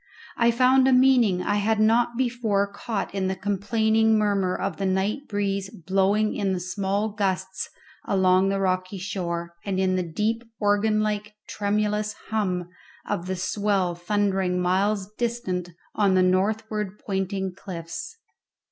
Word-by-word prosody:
I 235 0 +3
found 255 +2 +4
a 265 - +4
meaning 250 -8 +4
I 205 - +1
had 215 +1 +1
not 235 +2 +3
before 235 -5 +1
caught 200 +1 -4
in 195 -1 -1
the 190 - -1
complaining 220 +3 +2
murmur 200 -3 +1
of 195 - -3
the 195 - -2
night 195 +9 -1
breeze 200 -1 -1
blowing 195 +5 +1
in 190 -2 0
small 195 +3 -1
gusts 190 -2 -2 0.4
along 190 0 +3
the 195 0 0
rocky 185 0 -1
shore, 170 -3 -4
and 195 -2 -2
in 185 -1 +2
the - - +1
deep 210 +7 -1 0.2
organ 210 +1 +2
like 210 0 -2
tremulous 210 +1 -1 0.2
hum 185 -5 -1 0.4
of 175 - -2
the 190 - -1
swell 195 -1 0
thundering 190 0 0
miles 190 +2 +1
distant 225 -7 -2 0.2
on 200 -3 +3
the 185 - +4
northward 210 +2 0
pointing 190 -1 -2
cliffs. 180 - -7
200 Hz, 140 wpm, -25 LUFS, 185-215 Hz, 0.4 s, found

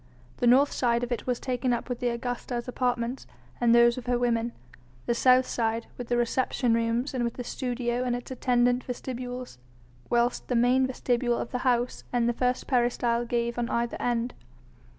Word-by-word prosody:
The 245 - +1
north 270 +4 +5
side 235 -1 +1
of 245 - -4
it 240 - -3
was 250 -1 0
taken 250 -1 -1
up 240 - -3
with 245 -2 -4
the 245 - 0
Augusta's 240 0 -4
apartments 245 0 -2 0.3
and 240 - +2
those 235 +1 +5
of 245 - -12
her 245 0 +2
women, 235 -1 0 0.5
the 235 - +1
south 255 +1 +5
side 225 -1 -1
with 245 - -7
the 240 - +1
reception 240 0 +1
rooms 230 +4 0
and 250 -2 -1
with 235 -1 -2
the 250 - -5
studio 245 -1 -2
and 245 -1 0
its 245 +1 -7
attendant 245 -1 +2
vestibules, 250 - -6 0.5
whilst 240 0 +1
the 250 - 0
main 250 +2 +4
vestibule 245 -2 0
of - - -4
the 250 - -2
house 245 -1 0
and 240 -1 +1
the 240 - +2
first 250 +1 0
peristyle 240 -2 +1
gave 235 0 -1
on 235 - -1
either 235 0 -1
end. 240 0 0
245 Hz, 190 wpm, -27 LUFS, 235-250 Hz, 0.5 s, north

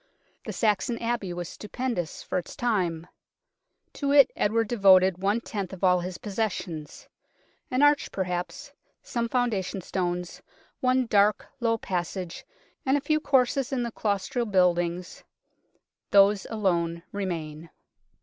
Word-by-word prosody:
The - - -2
Saxon 220 +2 +1
Abbey 230 -5 -2
was 175 -1 -4
stupendous 215 -5 -4
for - - -1
its 175 - -9
time. 180 -9 0 0.9
To 280 -1 -1
it 280 -2 +7
Edward 225 +2 +1
devoted 190 -5 +5
one 200 +4 +1
tenth 200 -5 -5
of 190 - -10
all 180 -1 +5
his 180 0 -5
possessions. 190 -7 -4 0.6
An 255 +3 +2
arch 290 0 +4
perhaps, 190 +10 -4 0.3
some 235 -1 -2
founda 240 -6 +1
tion 190 +1 -5
stones, 180 -1 -3 0.4
one 255 0 +2
dark, 210 -2 +3
low 230 -2 +1
passage 180 -2 -4 0.4
and 270 +2 +2
a - - 0
few 310 +2 +1
courses 270 -2 +2
in 255 -3 0
the 235 - -3
claustral 215 +3 -1
buildings 180 -2 +1 0.9
these 200 0 +5
alone 170 -6 0
remain. 165 -5 -4
200 Hz, 130 wpm, -27 LUFS, 180-240 Hz, 0.9 s, it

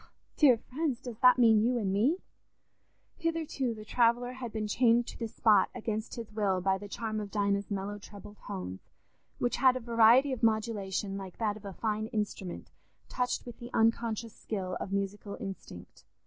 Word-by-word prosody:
_... - - -23
Ah, - - -24 0.3
dear 265 -6 +6
friends, 270 +1 -3
does 235 -3 -8
that 250 +1 +7
mean 225 -3 +6
you 245 +2 +2
and 195 -4 -1
me?" 245 - +2 1.0
Hitherto 320 -8 -2
the 215 0 -10
traveller 240 +2 +2
had 250 -3 -6
been 215 -1 -3
chained 235 +2 +3
to - - -9
the 230 - -2
spot 210 -2 +3
against 220 0 -3
his 230 -2 -7
will 200 -3 +1
by 190 +1 +1
the 205 - -8
charm 215 +1 -3
of 205 -1 -5
Dinah's 200 -1 0
mellow 200 +1 -3
treble 205 0 -12
tones, 90 0 -5 0.6
which 245 - 0
had 260 -1 +5
a - - -1
variety 235 +3 +5
of 255 - -3
modulation 210 -3 0
like 190 -2 -9
that 215 -2 0
of 215 -1 -12
a 195 - -6
fine 215 +2 -2
instrument 205 -5 -4 0.4
touched 250 -1 -1
with 240 - -10
the 240 - -8
unconscious 230 0 +1
skill 185 -4 -4
of 195 - -5
musical 200 +1 -3
instinct. 195 - -9
220 Hz, 185 wpm, -30 LUFS, 200-240 Hz, 1.0 s, that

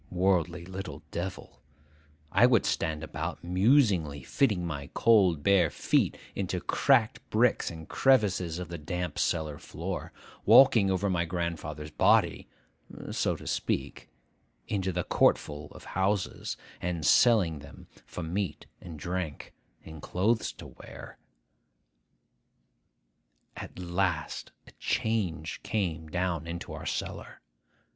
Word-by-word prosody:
Worldly 90 -2 +1
little 95 +1 -7
devil, 90 +2 -6 0.7
I 115 +6 +6
would 120 -4 +3
stand 80 -1 -1
about, 80 +2 -5
musingly 90 - +2
fitting 105 - +1
my 70 -4 -5
cold 95 -10 +4
bare 95 -4 +4
feet - - +1 0.2
into 95 -2 -2
cracked 120 +2 +2
bricks 115 +2 +2
and 80 -1 -9
crevices 100 -10 +2
of 90 -2 -6
the 85 -1 -6
damp 90 +2 -4
cellar 75 -3 -1
floor,—walking 115 -3 +2
over 95 +1 0
my 90 -3 +1
grandfather's 80 -3 -4
body, - - +3 0.6
so - - 0
to - - -11
speak, - - -3 0.6
into 95 -2 -1
the 90 0 -2
courtful 75 -2 +1
of - - -13
houses, 95 +1 -1 0.2
and 85 -3 -2
selling 90 - +4
them 70 0 -13 0.2
for 90 - -7
meat 90 +3 -3 0.2
and 85 -4 -9
drink, 85 -1 -4 0.3
and 80 -1 -10
clothes 110 +8 0
to - - -11
wear. - - -12 2.4
At - - -9
last 85 -3 -2
a - - -15
change 100 -9 -1
came 85 -7 -2
down 85 -1 -2
into 85 0 -6
our - - -7
cellar. - - -5
90 Hz, 120 wpm, -29 LUFS, 80-100 Hz, 2.4 s, I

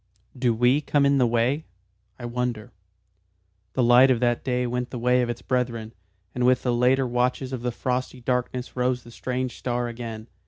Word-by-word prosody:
"Do 125 -2 +1
we 125 +5 +3
come 145 -1 +2
in 140 0 +3
the 125 - +4
way? 120 +6 +1 0.5
I 120 - -7
wonder 120 -1 -3 0.5
" 95 +1 -45
The 130 - +2
light 120 +2 +7
of 125 -3 +3
that 120 -1 +1
day 125 -1 0
went 125 +1 -2
the 125 - -6
way 125 +1 +2
of 120 - -1
its 120 - -5
brethren, 115 -3 -2 0.4
and 125 - -2
with 125 +1 +3
the 125 - +1
later 125 +2 +3
watches 125 +2 -1
of 125 - -4
the 125 0 -1
frosty 130 +1 -3
darkness 125 0 -2
rose 125 0 0
the 120 - -13
strange 125 +1 -4
star 120 -1 -1
again. 115 -2 -7
125 Hz, 195 wpm, -25 LUFS, 120-125 Hz, 0.5 s, light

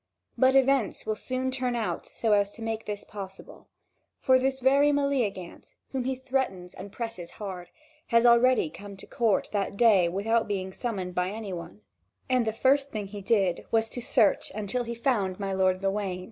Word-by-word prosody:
But 260 0 +4
events 270 -5 +2
will 215 0 -1
soon 255 +3 -3
turn 255 -2 -1
out 230 -2 -3
so 225 - -2
as 205 0 +2
to 230 - -9
make 225 0 -3
this 205 -1 -4
possible; 195 -2 -10 0.5
for 260 0 +4
this 265 +1 0
very 275 +3 +4
Meleagant, 255 -11 -2 0.2
whom 260 -2 -2
he 265 0 0
threatens 255 -9 -3
and 200 - -9
presses 225 -8 -6
hard, 185 -4 -6 0.4
had 230 0 +3
already 240 -7 +5
come 200 0 -10
to - - -9
court 225 -5 0
that 200 -1 -2
day 200 -7 +5
without 220 +5 0
being 190 -2 -3
summoned 190 -7 -4
by 180 +1 0
any 210 -1 -6
one; 105 - -8 0.5
and 255 -3 +1
the - - +2
first 275 +5 +2
thing 215 -5 -4
he 205 0 -7
did 195 -4 +1
was 225 0 +1
to 245 - -6
search 235 -3 +2
until 215 +4 -2
he 235 0 -4
found 210 -6 0
my 195 -1 -2
lord 185 0 +2
Gawain. 195 -2 -1
220 Hz, 185 wpm, -27 LUFS, 195-255 Hz, 0.5 s, already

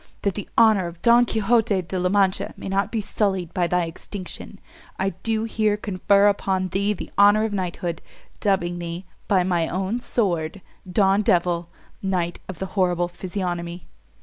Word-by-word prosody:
that 200 - +1
the 205 - -6
honour 220 -5 +5
of 170 0 -9
Don 240 +1 +6
Quixote 220 -3 +2
De 185 +2 -4
la 180 0 +1
Mancha 195 -1 +1
may - - -7
not 195 +1 0
be 230 - -1
sullied 190 -4 -1
by 180 -3 +1
thy 180 0 +1
extinction, 180 +3 -8 0.4
I 190 +1 +1
do 225 -1 0
here 215 -2 +1
confer 200 0 +3
upon 190 -2 0
thee 200 +3 0
the 195 - -8
honour 205 +1 +6
of 220 -1 -1
knighthood, 175 -3 -3 0.4
dubbing 175 -4 0
thee, 170 +2 -5 0.2
by 190 -3 +3
my 175 -3 +1
own 190 +6 -2
sword, 180 -7 -1 0.3
Don 195 +1 +3
Devil, 175 -3 +1 0.3
knight 180 -3 -1
of 185 - -6
the 190 - -3
horrible 175 -3 +1
physiognomy." 175 -2 -4
190 Hz, 165 wpm, -23 LUFS, 175-205 Hz, 0.4 s, Don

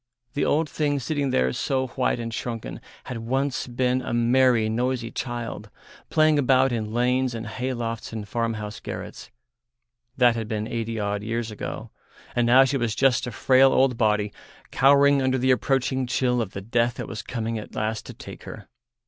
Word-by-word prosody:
The 145 - 0
old 155 +2 +2
thing 145 0 -1
sitting 140 +1 -1
there 65 - +1
so 130 -1 0
white 125 0 0
and 115 -1 -4
shrunken 115 -1 -5 0.2
had 125 - -6
once 130 +4 -1
been 125 +1 0
a 120 - -3
merry, 120 -1 +3
noisy 120 +1 -1
child, 120 -2 -5 0.4
playing 155 -1 +4
about 130 -1 +3
in 110 -3 -2
lanes 125 +1 +1
and 115 0 -5
hay 130 0 -3
lofts 115 -2 -4
and 110 -2 -6
farmhouse 110 -2 -3
garrets; - - -7 0.9
that 120 -2 +5
had 115 -2 -3
been 110 -1 -3
eighty 115 -1 -3
odd 100 0 -1
years 115 +1 -3
ago, 105 - -6 0.4
and 120 -1 +2
now 130 +3 +7
she 135 +1 0
was 120 -4 -1
just 130 -2 +2
a - - -4
frail 130 +4 +4
old 130 -2 +3
body 105 -2 +1 0.4
cowering 140 +1 +5
under 130 0 +1
the 130 +1 +2
approaching 130 0 +1
chill 125 -1 +1
of 105 -4 -5
the 100 - -5
death 120 +3 0
that - - -5
was 115 - -5
coming 115 -2 -3
at 105 - -10
last 110 0 -2
to - - -8
take - - -11
her. - - -9
120 Hz, 180 wpm, -25 LUFS, 115-130 Hz, 0.9 s, now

